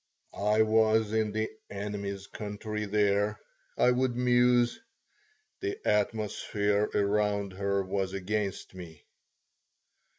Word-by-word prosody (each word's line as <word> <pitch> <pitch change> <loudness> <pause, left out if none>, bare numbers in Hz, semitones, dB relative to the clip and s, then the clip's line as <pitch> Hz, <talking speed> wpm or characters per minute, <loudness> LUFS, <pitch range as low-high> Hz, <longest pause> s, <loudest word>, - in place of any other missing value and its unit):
"I 105 +2 +3
was 110 0 +3
in 110 -1 +1
the 110 +1 -2 0.2
'enemy's 100 -1 -4
country' 105 +1 -5
there," 105 0 +1 0.4
I 125 - +5
would 125 0 +1
muse. 125 - +3 0.8
"The 395 +1 -3
atmosphere 105 -1 0
around 100 -1 +1
her 100 +1 0
was 95 0 -2
against 100 +1 -3
me." 85 -4 -11
105 Hz, 100 wpm, -29 LUFS, 100-110 Hz, 0.8 s, I